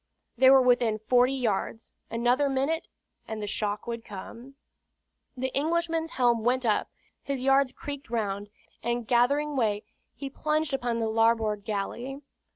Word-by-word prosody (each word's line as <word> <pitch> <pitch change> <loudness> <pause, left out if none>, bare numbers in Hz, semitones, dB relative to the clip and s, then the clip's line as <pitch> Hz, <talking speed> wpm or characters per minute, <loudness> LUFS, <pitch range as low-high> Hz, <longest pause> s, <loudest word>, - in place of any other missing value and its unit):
They 260 +2 +6
were 265 -1 +7
within 245 -3 +3
forty 250 +4 +3
yards 225 -2 -2 0.2
another 245 +5 +2
minute, 280 +5 0 0.4
and 220 -1 -5
the 210 - -3
shock 205 0 -2
would 235 -1 -5
come. 230 +7 -10 0.8
The 260 +1 -3
Englishman's 325 +2 0
helm 240 -3 +2
went 250 +2 +1
up, 215 -2 +1 0.3
his 275 -2 -3
yards 270 0 +4
creaked 285 -1 -7
round, 205 -3 -2 0.3
and 240 0 -1
gathering 280 +5 +2
way 215 -5 +1 0.3
he 275 - -6
plunged 305 +2 -1
upon 245 -3 -1
the 225 -1 0
larboard 220 -2 +2
galley. 240 +7 -4
245 Hz, 145 wpm, -28 LUFS, 225-275 Hz, 0.8 s, were